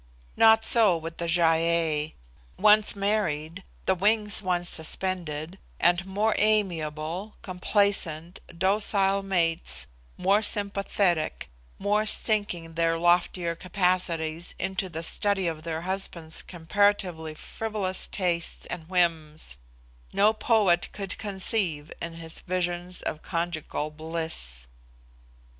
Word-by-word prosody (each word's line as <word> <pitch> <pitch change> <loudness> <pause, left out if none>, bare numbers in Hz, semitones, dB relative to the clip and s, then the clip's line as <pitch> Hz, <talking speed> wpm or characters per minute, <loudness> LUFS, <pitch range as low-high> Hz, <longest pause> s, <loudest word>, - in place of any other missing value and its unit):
Not 220 0 +6
so 215 -7 +7
with 165 +1 -7
the 170 - -3
Gy 170 +1 +3
ei: 165 -2 +1 0.4
once 210 0 +5
married, 195 -4 -1 0.2
the 190 - +3
wings 210 +2 +2
once 180 -2 0
suspended, 170 0 -2 0.2
and 175 +1 +2
more 210 +3 +1
amiable, 180 -3 -1
complacent, 180 -3 0 0.2
docile 195 +1 +3
mates, 165 - 0 0.3
more 200 +3 +3
sympathetic, 200 -5 0 0.3
more 210 +2 +1
sinking 205 -7 0
their 165 0 +1
loftier 175 0 +2
capacities 175 -2 0
into 190 0 -2
the 165 -1 -6
study 200 +2 +1
of 160 -2 -2
their 160 0 -4
husbands' 175 -3 -3
comparatively 175 -2 0
frivolous 205 +1 -3
tastes 175 -3 -1
and 165 -1 -7
whims, 160 - 0 0.5
no 210 +2 +4
poet 210 -6 +2
could 195 -2 -5
conceive 190 -6 -1
in 165 0 -5
his 165 -1 -6
visions 175 0 -3
of 155 - -4
conjugal 165 -3 -3
bliss. 155 - -2
175 Hz, 110 wpm, -26 LUFS, 165-200 Hz, 0.5 s, so